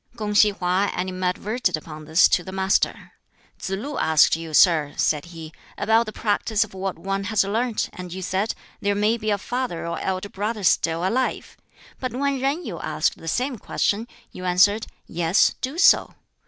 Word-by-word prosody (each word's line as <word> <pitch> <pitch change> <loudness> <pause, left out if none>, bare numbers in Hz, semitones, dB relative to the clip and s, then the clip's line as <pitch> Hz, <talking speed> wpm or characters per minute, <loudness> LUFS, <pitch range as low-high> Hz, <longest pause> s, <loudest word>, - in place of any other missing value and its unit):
Kung 210 -2 -3
si 210 0 +6
Hwa 190 +1 0
animadverted 185 +2 -1
upon 155 0 -10
this 160 +4 +5
to 175 - +2
the 190 - -8
Master. 190 0 0 0.5
"Tsz - - -5
lu 245 +9 -4
asked 160 -1 +4
you, 165 -1 -7
sir," 155 -3 +4
said 150 0 +1
he, 165 -2 -10 0.2
"about 225 +2 +2
the - - -4
practice 215 0 0
of 220 - -12
what 190 0 -4
one 195 +3 -3
has 215 0 +2
learnt, 225 +3 -1
and 180 -1 -8
you 190 +1 -6
said, 195 +5 -1 0.2
'There 205 0 0
may 210 +3 +2
be 215 -1 -2
a 205 - +2
father 245 -4 -3
or 170 - -3
elder 190 +1 -3
brother 210 +2 -3
still 170 0 +2
alive'; 255 +6 -2 0.4
but 255 -3 -4
when 275 +1 -1
Yen 280 +6 -1
Yu - - -5
asked - - -1
the 165 - -11
same 250 - -1
question, 215 +4 -1 0.2
you 185 - -9
answered, 195 +4 +3 0.2
'Yes, 170 +3 +2
do 265 +5 -3
so.' 390 +2 +4
195 Hz, 180 wpm, -23 LUFS, 180-225 Hz, 0.5 s, si